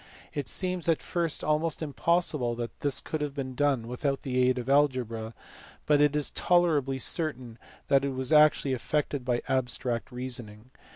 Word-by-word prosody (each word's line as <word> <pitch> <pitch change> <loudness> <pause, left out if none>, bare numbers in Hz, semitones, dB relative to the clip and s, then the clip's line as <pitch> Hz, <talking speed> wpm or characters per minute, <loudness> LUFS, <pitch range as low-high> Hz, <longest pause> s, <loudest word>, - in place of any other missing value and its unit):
It 145 -3 -3
seems 180 -2 0
at 165 - +3
first 170 -3 -1
almost 155 +1 0
impossible 150 -4 0
that 120 0 -6
this 145 -2 +1
could 155 - -4
have 145 -2 -3
been 130 -2 -4
done 135 -4 0
without 135 +3 -2
the 130 -2 -2
aid 125 0 +3
of 125 0 -5
algebra, 125 -6 +1 0.5
but 145 -1 +3
it 150 0 +3
is 150 -1 -1
tolerably 155 -7 +2
certain 130 -5 -1 0.3
that 135 -1 +3
it 140 - 0
was 130 +2 -1
actually 150 -3 +5
effected 145 +1 -2
by 125 -1 -1
abstract 125 -1 -1
reasoning. 125 -2 -6
135 Hz, 165 wpm, -28 LUFS, 125-150 Hz, 0.5 s, actually